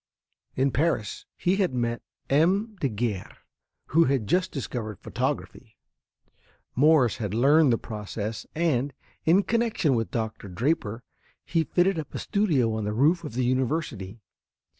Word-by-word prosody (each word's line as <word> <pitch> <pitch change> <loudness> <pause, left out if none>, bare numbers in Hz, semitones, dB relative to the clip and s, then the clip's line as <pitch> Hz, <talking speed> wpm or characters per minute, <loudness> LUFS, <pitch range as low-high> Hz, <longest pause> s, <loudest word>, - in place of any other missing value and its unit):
In 135 +1 +2
Paris 130 - -1
he 180 +2 +1
had 185 -9 +1
met 120 -1 -1 0.3
M. 190 +10 +2
Daguerre, 110 - -2 0.5
who 165 +2 +5
had 130 -6 +1
just 180 - +1
discovered 115 -6 -4
photography. - - -4 1.0
Morse 140 -4 +4
had 105 -2 -3
learned 140 +4 +5
the 115 - +3
process 105 0 -5
and, 145 -5 +1 0.3
in 175 +5 +5
connection 230 - +1
with 115 -2 0
Doctor 110 -3 -4
Draper, 115 - -1 0.4
he 165 -2 +1
fitted 180 +1 +2
up 155 - -7
a - - -1
studio 155 - +1
on 110 -1 -2
the 105 +1 -2
roof 155 +9 +3
of 145 -7 -7
the 125 0 +1
university. 125 - -2
130 Hz, 140 wpm, -26 LUFS, 115-165 Hz, 1.0 s, who